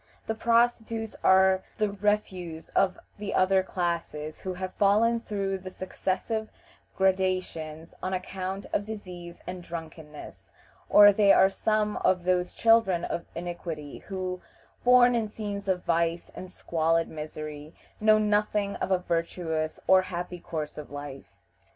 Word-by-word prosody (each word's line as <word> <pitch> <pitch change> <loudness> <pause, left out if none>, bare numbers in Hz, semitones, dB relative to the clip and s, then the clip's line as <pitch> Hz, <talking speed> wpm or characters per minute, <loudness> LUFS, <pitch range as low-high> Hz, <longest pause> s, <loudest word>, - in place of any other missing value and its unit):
The 225 - -1
prostitutes 230 -1 +1
are 190 0 +5 0.2
the 210 -3 +1
refuse 195 -5 -2
of 190 -1 +2 0.2
the 205 -1 -3
other 190 +1 +4
classes 170 -4 -3
who 185 -1 -4
have 185 0 -5
fallen 220 +4 +3
through 195 -4 -3
the 185 0 -8
successive 190 +4 -3 0.5
gradations 185 -4 -1
on 185 - -2
account 190 +1 -4
of 205 - 0
disease 180 -5 -8
and 180 0 -6
drunkenness, 160 -3 -9 0.4
or 205 0 +8
they 200 -1 +5
are 190 - +6
some 210 +1 0
of 180 -1 +2
those 180 0 0
children 225 -7 +4
of 170 - -4
iniquity 170 -4 -6
who, 185 -2 -5 0.4
born 245 0 +6
in 230 -2 0
scenes 205 -2 -5
of 185 -2 0
vice 170 0 0
and 185 - -8
squalid 165 -2 0
misery, 155 0 -7 0.2
know 215 0 +5
nothing 210 -1 +1
of - - -3
a 190 - +4
virtuous 165 -2 -2
or 190 0 +6
happy 180 -1 -5
course 155 -3 -5
of 150 - -9
life. 145 -1 -9
185 Hz, 140 wpm, -27 LUFS, 170-205 Hz, 0.5 s, or